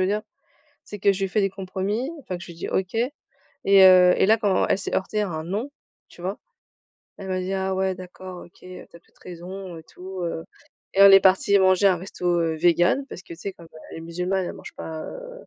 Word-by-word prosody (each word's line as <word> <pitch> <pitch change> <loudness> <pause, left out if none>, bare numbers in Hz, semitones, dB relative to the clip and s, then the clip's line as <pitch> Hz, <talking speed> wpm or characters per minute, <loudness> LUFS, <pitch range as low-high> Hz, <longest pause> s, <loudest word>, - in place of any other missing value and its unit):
veux 185 - +2
dire? 210 +1 -1 0.6
C'est 205 - -9
que 200 - +4
je 195 0 -4
lui 190 - -1
fais 210 - +1
des 195 - +1
compromis, 195 +6 -3
enfin, 185 -9 -6
que 180 - -10
je - - -12
lui 170 - -9
dis - - -6
OK 190 +3 -2 0.7
et 195 -1 +7
heu, 180 -1 +7
et - - +4
là 220 +1 +5
quand 205 -4 +1
elle - - +2
s'est - - -5
heurtée 210 +3 -1
à 200 - -2
un 160 -1 -4
«non», 210 +10 -3 0.4
tu 175 - -15
vois, 190 +3 -3 0.8
elle 195 - -8
m'a 185 - -1
dit: 185 +1 -3
«Ah 190 0 -1
ouais 190 0 0
d'accord 185 0 -10
OK, 175 - -22
heu, 185 0 -10
tu - - -18
as - - -22
peut - - -35
être - - -32
raison 180 0 -8
et 160 - -12
tout, 185 +2 -9
heu», 165 -1 -3 0.5
et 195 - +3
on 200 - +10
est 195 - +9
parties 190 +2 +4
manger 185 +1 +4
un 185 -3 +3
resto, 175 -1 -2
heu, 165 -1 0
végan, 175 - +3
parce - - -8
que 170 - -10
tu - - -13
sais, 195 +2 -5
comme 170 -2 -15 0.2
elle - - -8
est - - -9
musulmane 180 +3 -2
elle - - -5
mange - - -11
pas, 160 -1 -6
heu, - - -9
185 Hz, 250 wpm, -24 LUFS, 175-195 Hz, 0.8 s, on